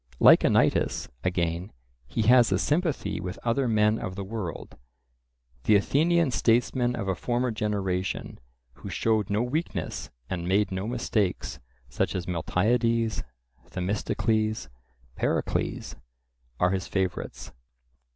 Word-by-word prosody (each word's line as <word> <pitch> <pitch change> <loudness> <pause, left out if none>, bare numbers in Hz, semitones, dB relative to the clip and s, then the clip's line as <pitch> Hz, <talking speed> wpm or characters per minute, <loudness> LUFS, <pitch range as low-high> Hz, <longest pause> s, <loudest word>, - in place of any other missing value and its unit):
Like - - +8
Anytus, - - +2
again, 85 0 -1 0.4
he 110 - -1
has 120 0 +6
a 95 - +3
sympathy 150 - 0
with 90 +1 -5
other 120 +3 +1
men 110 -1 +3
of 95 - -5
the 100 - -4
world; 95 -5 -6 0.9
the 110 - +5
Athenian 160 - +3
statesmen 120 +1 +2
of 100 - -4
a 95 - +2
former 120 +6 -1
generation, 100 -4 -2 0.3
who - - -9
showed 110 -3 +1
no 105 +3 +1
weakness 150 +7 -3 0.2
and 85 -2 -3
made 100 +2 +2
no 95 +2 -3
mistakes, 110 -5 -1 0.3
such 65 - -1
as 90 -2 -2
Miltiades, 115 +6 +1 0.5
Themistocles, 110 - -1 0.5
Pericles, - - -1 0.6
are 90 +1 +3
his 95 -1 -2
favourites. 95 -2 -3
105 Hz, 120 wpm, -27 LUFS, 95-120 Hz, 0.9 s, Like